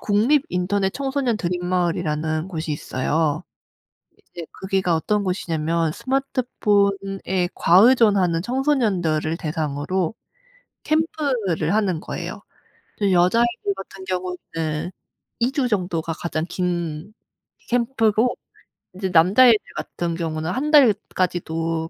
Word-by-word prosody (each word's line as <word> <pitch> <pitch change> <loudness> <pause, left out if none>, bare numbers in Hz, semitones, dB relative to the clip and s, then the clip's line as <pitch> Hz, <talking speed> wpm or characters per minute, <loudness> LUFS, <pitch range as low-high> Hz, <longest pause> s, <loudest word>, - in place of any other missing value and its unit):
국립 235 +8 +2
인터넷 190 +2 0
청소년 270 -4 -1
드림 175 -2 -3
마을이라는 165 -2 -1
곳이 160 -3 -4
있어요. 145 +2 -1 0.9
이제 170 -2 -6 0.2
거기가 190 -3 +1
어떤 205 +5 0
곳이냐면 165 -3 -1
스마트폰에 200 - 0
과의존하는 195 -3 +4
청소년들을 200 - 0
대상으로 155 +3 -2 0.7
캠프를 265 - 0
하는 195 -6 +1
거예요. - - -6 0.6
이제 200 -2 +2
여자애들 215 +4 +2
같은 195 0 -10
경우는 180 -3 -4 0.5
2 240 +3 +1
주 270 -3 0
정도가 175 -5 -1
가장 165 -1 -3
긴 175 +1 -3 0.6
캠프고 235 -1 +2 0.6
이제 190 0 -3
남자애들 205 +8 +6 0.2
같은 170 -1 -3
경우는 160 0 -3
1 290 +8 -2
달까지도 175 - +2
185 Hz, 260 characters per minute, -22 LUFS, 165-220 Hz, 0.9 s, 남자애들